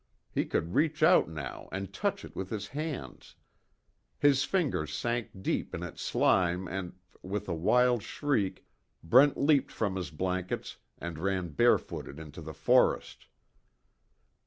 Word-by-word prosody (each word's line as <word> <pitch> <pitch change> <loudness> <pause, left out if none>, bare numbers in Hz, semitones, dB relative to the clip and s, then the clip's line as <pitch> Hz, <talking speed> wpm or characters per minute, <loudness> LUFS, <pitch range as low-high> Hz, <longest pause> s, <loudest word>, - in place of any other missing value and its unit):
He - - 0
could 85 +3 -1
reach 155 0 +2
out 175 - +6
now 75 -4 -7
and 95 0 -5
touch - - -2
it - - -13
with 95 0 -4
his 105 -2 -4
hands. 150 0 -6 0.8
His 140 -1 +4
fingers 140 - 0
sank 120 +9 -2
deep - - -1
in 85 - -5
its 85 - -7
slime 90 +1 +2
and 95 -2 -4 0.3
with 100 +2 -4
a 90 - -1
wild 120 +8 +3
shriek, 110 -5 -1 0.4
Brent 130 - +6
leaped 140 -1 +3
from 100 -4 -1
his 90 - -4
blankets, 90 +3 -3 0.2
and 85 -2 -6
ran 95 -1 -1
barefooted 75 - +1
into 80 +1 -9
the 80 0 -7
forest. - - +2
95 Hz, 140 wpm, -30 LUFS, 85-130 Hz, 0.8 s, out